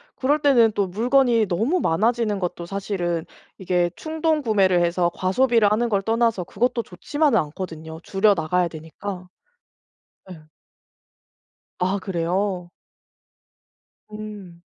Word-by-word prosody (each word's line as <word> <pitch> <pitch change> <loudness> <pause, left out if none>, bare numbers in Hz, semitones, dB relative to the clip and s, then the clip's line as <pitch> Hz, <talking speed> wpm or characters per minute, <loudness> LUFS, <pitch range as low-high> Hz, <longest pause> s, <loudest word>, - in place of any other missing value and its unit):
그럴 285 +3 +1
때는 245 -6 +5
또 200 -2 0
물건이 235 +3 +2
너무 225 - 0
많아지는 215 - +1
것도 175 -1 -4
사실은 175 -3 -3 0.3
이게 180 -2 0
충동구매를 275 - +1
해서 175 0 +1
과소비를 220 +2 +2
하는 235 +3 +1
걸 200 -3 +1
떠나서 225 -2 +1
그것도 235 +6 -1
좋지만은 270 - 0
않거든요. 160 0 -6
줄여 205 +2 +3
나가야 175 +2 0
되니까. 175 +4 -8 1.0
네. 180 -4 -10 1.4
아 185 +2 0
그래요. 180 0 -2 1.4
음. 210 -5 -9
195 Hz, 255 characters per minute, -23 LUFS, 175-230 Hz, 1.4 s, 때는